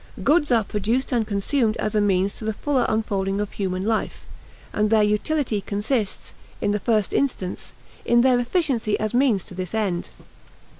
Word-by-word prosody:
Goods 295 -1 +3
are 230 -2 +4
produced 225 +7 -1
and 230 -4 +1
consumed 220 +3 0
as 215 - -2
a 210 - +3
means 195 -1 +1
to - - -8
the 220 -1 -2
fuller 280 0 0
unfolding 200 -3 -1
of 210 -1 -2
human 185 -1 -2
life; 220 0 -2 0.5
and 210 0 +1
their 220 -1 +4
utility 210 +2 0
consists, 205 +1 -2 0.3
in 205 - 0
the 210 - 0
first 215 -1 +1
instance, 220 -10 -2 0.3
in 240 0 +4
their 255 -1 +4
efficiency 245 - 0
as 215 +1 -2
means 240 -7 +2
to - - -12
this 185 +2 -4
end. 195 -6 -1
215 Hz, 170 wpm, -23 LUFS, 200-245 Hz, 0.5 s, are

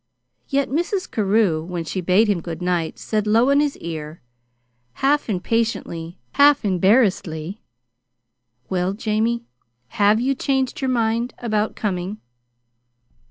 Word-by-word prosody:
Yet 280 0 +1
Mrs. 350 +6 -1
Carew, 200 -6 +2
when 175 0 -4
she 185 +4 -3
bade 185 +5 +3
him 200 -5 +1
good 165 -1 -6
night, 175 -3 -1
said 215 -1 -2
low 230 +5 +4
in 280 - +4
his 295 -1 0
ear, 160 -1 -6 0.7
half 280 - +1
impatiently, 185 -4 -2
half 285 -4 +5
embarrassedly: 190 -3 +1 1.1
"Well, 185 +1 -1
Jamie, 225 +3 -1 0.5
have 210 - +3
you 260 +3 +1
changed 265 -1 -1
your 265 - 0
mind 235 0 0
about 215 -2 -1
coming?" 190 0 -3
215 Hz, 120 wpm, -22 LUFS, 180-240 Hz, 1.1 s, half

